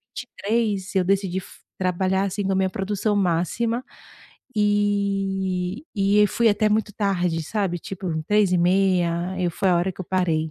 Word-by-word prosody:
23 210 -5 -2
eu 185 - +3
decidi 195 -1 0
f - - -14 0.2
trabalhar 190 +1 0
assim 200 +1 -3
com 195 - +1
a - - 0
minha 190 0 +2
produção 205 0 -1
máxima. 205 +7 0 0.7
E 195 -1 0
e 200 +1 +3
aí 210 - +6
fui 230 +3 +2
até 215 +1 +2
muito 215 0 +1
tarde, 180 -5 0
sabe 190 0 -2
tipo 190 +1 -6 0.2
3h30. 180 -2 +2
E 175 -1 0
foi 190 +3 0
a 175 - +4
hora 180 +2 0
que - - -11
eu - - -4
parei. 165 -4 0
195 Hz, 160 wpm, -23 LUFS, 180-205 Hz, 0.7 s, aí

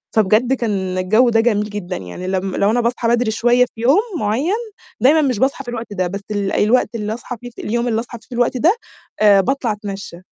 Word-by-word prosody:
فبجد 220 +4 +3
كان 195 -7 -2
الجو 215 +7 +3
ده 225 -1 +3
جميل 210 -2 +1
جدًا، 200 -3 -5
يعني 95 - -7
لم 190 0 -2
لو 200 +2 +2
أنا 245 - +2
باصحى 235 0 -1
بدري 235 -1 +2
شوية 240 +2 +3
في 225 - -8
يوم 265 +8 +4 0.2
معيّن 255 - 0 0.5
دايمًا 310 +5 +5
مش 255 -7 0
باصحى 275 +1 0
في 245 - -8
الوقت 230 -3 -6
ده، 185 -2 -1
بس 195 +3 -5
الوقت 210 +4 +1
اللي 210 -1 -2
أصحى 240 +1 -7
فيه 245 - -8
ف 235 - -16
اليوم 235 +3 -1
اللي 225 -2 +1
أصحى 235 +1 -7
فيه - - -23
في 245 - -8
الوقت 245 +1 +1
ده 330 - +4 0.7
باطلع 260 +1 -1
أتمشّى، 200 -4 -6
225 Hz, 215 wpm, -19 LUFS, 205-245 Hz, 0.7 s, دايمًا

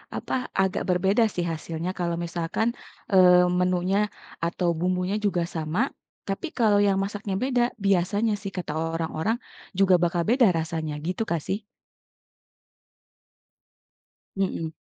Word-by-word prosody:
apa - - -4 0.3
agak 190 -1 0
berbeda 190 +5 +3
sih 175 - -1
hasilnya, 165 +2 -4
kalau 170 -1 0
misalkan, 170 +5 -1 0.4
eee, 180 -2 +7
menunya 180 +1 +1 0.5
atau 170 +1 0
bumbunya 180 +2 0
juga 180 -4 +1
sama 155 +1 -1 0.5
tapi 200 - -3
kalau 205 -3 +4
yang 195 -1 +3
masaknya 200 -1 -4
beda, 250 -2 +2 0.2
biasanya 200 +3 +2
sih 200 -1 -5
kata 180 -5 -4
orang-orang 165 +6 -1 0.4
juga 190 -2 +6
bakal 170 0 0
beda 240 -3 +5
rasanya, 160 -1 -3
gitu 185 +5 -1
kah 170 - +1
sih? 205 +3 -2 2.7
Mhm. 185 -4 -2
180 Hz, 120 wpm, -25 LUFS, 170-200 Hz, 2.7 s, eee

